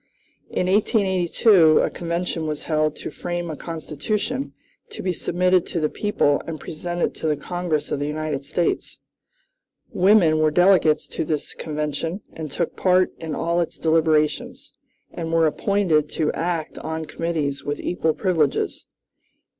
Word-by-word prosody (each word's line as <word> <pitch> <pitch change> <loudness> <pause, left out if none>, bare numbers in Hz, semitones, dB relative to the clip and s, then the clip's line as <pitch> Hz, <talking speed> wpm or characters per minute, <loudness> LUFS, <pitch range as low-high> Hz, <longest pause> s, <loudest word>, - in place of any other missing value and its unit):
"In - - -1
1882 190 -3 +4
a - - 0
convention 170 -1 -3
was 150 -1 -3
held 155 -1 0
to - - -7
frame 175 -1 -4
a - - -5
constitution 205 - -3 0.4
to 425 - -8
be 185 - 0
submitted 180 +1 +1
to 170 - -2
the 155 -1 +1
people 145 -9 +1
and 160 -2 -5
presented 175 +4 -3
to - - -4
the 150 -1 +1
Congress 175 -1 -2
of - - -1
the 145 - -1
United 150 -2 -3
States. 170 +4 -1 0.9
Women 180 -5 +4
were 155 0 +4
delegates 175 -2 +4
to - - -2
this 150 -1 -3
convention, 150 +4 -3
and 160 -2 -6
took 155 - -2
part 185 0 +3
in 160 -2 -4
all 170 +3 0
its 170 - -4
deliberations, 160 -2 +1 0.4
and 165 -1 -5
were 165 -1 +4
appointed 160 -2 +1
to 155 -2 0
act 170 -2 -3
on 160 0 -4
committees 150 -4 -2
with 145 0 -3
equal 160 -3 0
privileges. 165 -7 0
165 Hz, 145 wpm, -23 LUFS, 155-180 Hz, 0.9 s, 1882